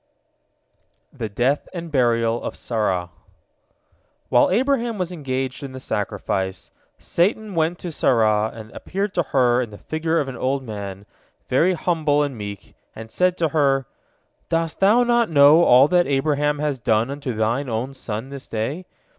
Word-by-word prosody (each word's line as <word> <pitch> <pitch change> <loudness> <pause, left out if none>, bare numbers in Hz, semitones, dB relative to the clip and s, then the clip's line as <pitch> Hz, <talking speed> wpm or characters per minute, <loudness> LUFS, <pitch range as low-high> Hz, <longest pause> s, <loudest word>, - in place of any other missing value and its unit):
THE 110 - -5
DEATH 125 +8 0
AND 170 -2 -6
BURIAL 120 -3 +1
OF - - -5
SARAH 95 -7 -2 1.2
While - - +4
Abraham 240 -3 +1
was 180 -2 -2
engaged 135 -5 -3
in 135 -2 -7
the 130 - -7
sacrifice, 95 -6 -3 0.3
Satan 205 +4 0
went 165 +1 0
to 175 - -6
Sarah, 110 -6 +2
and 110 -1 -11
appeared 195 +1 -4
to 175 - +1
her 125 -4 +2
in 120 - -4
the 105 - -11
figure 160 +5 -1
of 145 - -1
an 135 - -6
old 135 +2 -1
man, 100 -4 -7 0.4
very 170 +8 +3
humble 155 -4 +1
and 140 -3 -3
meek, 100 -2 -8 0.2
and 110 0 -9
said 180 0 +1
to 165 -2 +1
her: 135 -3 +2 0.6
"Dost 165 -1 -1
thou 215 +5 +5
not 240 -1 +2
know 150 +2 +6
all 130 0 +6
that 180 -1 +3
Abraham 145 +1 +1
has 145 -3 -2
done 115 +2 +1
unto 140 -3 -4
thine 115 +5 0
only 120 +4 -3
son 115 -1 -6
this 140 -1 -9
day? 135 +12 -4
140 Hz, 160 wpm, -22 LUFS, 115-165 Hz, 1.2 s, know